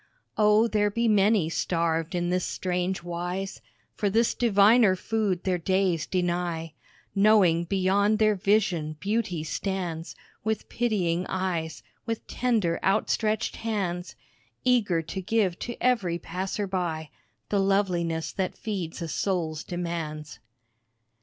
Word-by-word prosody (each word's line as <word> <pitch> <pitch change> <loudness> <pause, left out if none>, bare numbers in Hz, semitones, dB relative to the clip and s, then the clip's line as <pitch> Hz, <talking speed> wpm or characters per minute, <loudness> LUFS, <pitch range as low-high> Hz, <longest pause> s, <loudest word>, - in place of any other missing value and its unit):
O, 210 +1 +4
there 210 -2 +2
be 230 +3 0
many 210 -4 +4
starved 165 +1 -1
in 175 0 0
this 180 0 +1
strange 180 0 -2
wise 175 +3 -4 0.3
For 205 - 0
this 225 +3 +2
diviner 215 -2 +5
food 200 -2 -1
their 185 -2 0
days 185 -3 +1
deny, 175 -3 -1 0.4
Knowing 195 -5 +4
beyond 200 +3 +2
their 215 -1 +4
vision 185 -6 +1
beauty 200 -4 -1
stands 175 -1 -3 0.3
With 220 0 -2
pitying 185 -7 0
eyes 170 -4 -2 0.2
with 225 -1 -3
tender, 220 -9 0
outstretched 215 +2 +1
hands, 190 -6 -3 0.5
Eager 205 -10 +2
to 190 +4 -5
give 190 -2 0
to 240 - -5
every 215 -9 +1
passer 185 +4 -3
by 170 -5 -3 0.4
The 205 - +1
loveliness 180 -5 +1
that 190 -1 -3
feeds 185 -6 -4
a - - -3
soul's 160 -3 -1
demands. 165 -6 -5
185 Hz, 120 wpm, -27 LUFS, 170-210 Hz, 0.5 s, diviner